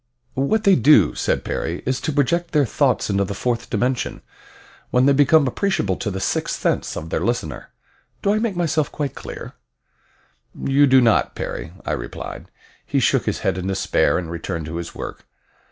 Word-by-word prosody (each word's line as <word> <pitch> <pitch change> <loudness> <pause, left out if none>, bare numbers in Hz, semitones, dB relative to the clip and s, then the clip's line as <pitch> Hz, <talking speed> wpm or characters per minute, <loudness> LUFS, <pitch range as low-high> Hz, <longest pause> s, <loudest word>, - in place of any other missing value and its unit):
"What 170 +12 +1
they 200 -2 +6
do," 115 - +5
said - - -1
Perry, 85 +2 -3
"is 130 0 -1
to 160 - -1
project 170 +5 0
their 150 -2 +4
thoughts 125 -2 +1
into 100 0 +2
the 100 +1 -4
fourth 120 +2 -2
dimension, 125 0 -1 0.7
when 125 +1 +3
they 140 - +5
become 145 +2 +5
appreciable 130 - 0
to 110 - -3
the 95 -1 -4
sixth - - -1
sense - - -1
of 80 +1 -6
their - - 0
listener. 120 +8 -3 0.5
Do 200 - +3
I 215 - +1
make 220 -4 -1
myself 160 -3 0
quite 145 -2 -3
clear?" - - -8 1.1
"You 140 +1 +3
do 130 0 +6
not, 115 -3 +2
Perry," 80 - -5
I - - -2
replied. - - -6 0.3
He - - 0
shook - - +2
his - - -1
head 90 - 0
in 90 - -4
despair, 95 0 +1
and 85 -2 -4
returned 85 -1 -4
to 80 +2 -5
his 85 - -6
work. - - -7
125 Hz, 185 wpm, -21 LUFS, 95-150 Hz, 1.1 s, they